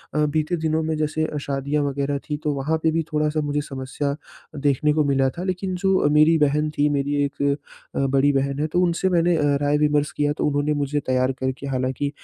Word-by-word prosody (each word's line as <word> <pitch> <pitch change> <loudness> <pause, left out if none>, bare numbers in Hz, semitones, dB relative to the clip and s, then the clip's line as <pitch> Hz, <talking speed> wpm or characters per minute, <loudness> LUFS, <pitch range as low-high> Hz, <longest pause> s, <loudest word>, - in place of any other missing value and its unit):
अ, 150 - +3
बीते 155 +3 0
दिनों 160 0 0
में 160 0 -1
जैसे 155 +1 -1
शादियाँ 140 +1 -1
वग़ैरह 140 0 -1
थी 150 - -1
तो 150 -1 0
वहाँ 150 +4 0
पे 160 - +3
भी 165 0 0
थोड़ा-सा 150 0 +1
मुझे 145 0 0
समस्या 140 +1 -3 0.5
देखने 145 +1 +2
को 155 -1 +2
मिला 135 -1 +2
था 180 - -3
लेकिन 185 0 -2
जो 190 -5 +3
मेरी 155 +2 +5
बहन 150 +2 0
थी 145 +1 +3
मेरी 145 +1 0
1 140 - -6 0.5
अ, - - 0
बड़ी 135 +2 +3
बहन 140 +1 0
है 155 - 0
तो 175 +3 +1
उनसे 180 +2 +1
मैंने 175 -1 +3
अ, 150 - 0 0.2
राय 145 +1 +2
विमर्श 150 +1 +1
किया 145 0 0
तो - - 0
उन्होंने 145 +1 +1
मुझे 145 +1 -1
तैयार 130 0 +2
करके 130 +1 -3
हालाँकि 130 +2 -1
150 Hz, 210 wpm, -23 LUFS, 140-155 Hz, 0.5 s, मेरी